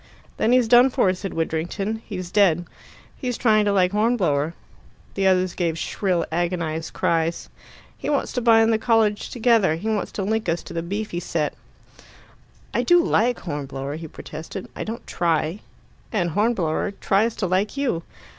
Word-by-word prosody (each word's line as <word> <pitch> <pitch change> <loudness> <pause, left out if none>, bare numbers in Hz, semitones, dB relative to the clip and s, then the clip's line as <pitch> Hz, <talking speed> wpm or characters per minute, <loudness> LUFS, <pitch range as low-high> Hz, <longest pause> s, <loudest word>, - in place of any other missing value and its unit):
"Then 225 - +2
he's 250 -2 +4
done 245 +3 +7
for," 245 -8 +2
said 190 +1 -6
Widdrington. 175 +7 -2
"He's 185 -4 -6
dead." 175 -5 +3 0.5
"He's 250 -3 -3
trying 215 -3 +3
to 205 - +2
like 185 -2 +3
Hornblower." 185 -9 +1 0.6
The 195 -1 +1
others 185 -1 +2
gave 165 -3 -1
shrill 180 +1 -1
agonized 165 -2 -2
cries. 165 0 0 0.5
"He - - -3
wants 290 - 0
to 250 - -1
bind 225 -1 +5
the 220 - +1
college 220 -2 +2
together. 225 -8 +3
He 180 +7 -5
wants 215 -4 -1
to 200 - -3
link 220 -1 -1
us 165 +1 -1
to - - -9
the 165 - -2
beefy 195 +1 -3
set." 165 -3 -2 1.2
"I - - +2
do 350 0 +5
like 245 -3 +1
Hornblower," 140 -2 -5
he 160 0 -7
protested. 160 +5 -8
"I - - -4
don't 225 +2 -6
try." 165 +2 0 0.5
"And 175 -6 0
Hornblower 200 -2 0
tries 215 +4 +2
to 195 - -2
like 190 +7 0
you." 255 -12 0
190 Hz, 165 wpm, -23 LUFS, 165-220 Hz, 1.2 s, done